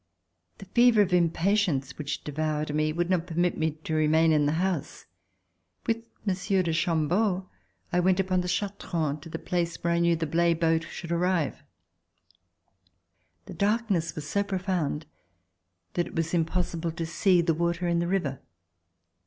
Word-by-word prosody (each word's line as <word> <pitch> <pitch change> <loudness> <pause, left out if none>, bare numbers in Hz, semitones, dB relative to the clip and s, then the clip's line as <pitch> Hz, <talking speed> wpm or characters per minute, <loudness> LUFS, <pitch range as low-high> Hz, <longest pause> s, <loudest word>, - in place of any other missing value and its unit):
The 195 - -10
fever 235 +1 +5
of 180 -2 -3
impatience 170 -4 +1
which 145 -1 -4
devoured 150 0 -2
me 155 0 +1
would 170 +2 -1
not 175 -2 +1
permit 175 +1 +1
me 160 0 +1
to 160 - -3
remain 155 +1 +4
in 150 -2 +3
the 150 - +1
house. 175 -2 -2 0.8
With 230 0 -1 0.2
Monsieur 190 0 +1
de 165 -2 -1
Chambeau 180 +4 +1 0.5
I 175 - +3
went 185 +1 +3
upon 185 -1 +1
the 180 - -4
Chartrons 170 -6 -2
to 165 - -10
the 165 - -4
place 170 0 -2
where 170 0 -1
I 170 - +2
knew 170 0 +3
the 165 0 -2
Blaye 170 +2 +2
boat 165 -1 +2
should 170 - -7
arrive. 170 -3 0 1.8
The - - -9
darkness 200 -6 0
was 150 -1 -6
so 200 - +1
profound 185 -6 -2 0.9
that 175 - 0
it - - -11
was 165 0 -1
impossible 170 0 -1
to 165 0 -3
see 175 +2 +3
the 165 -1 +2
water 170 +2 -1
in 170 0 +2
the 170 - 0
river. 165 -8 -1
170 Hz, 160 wpm, -27 LUFS, 160-185 Hz, 1.8 s, fever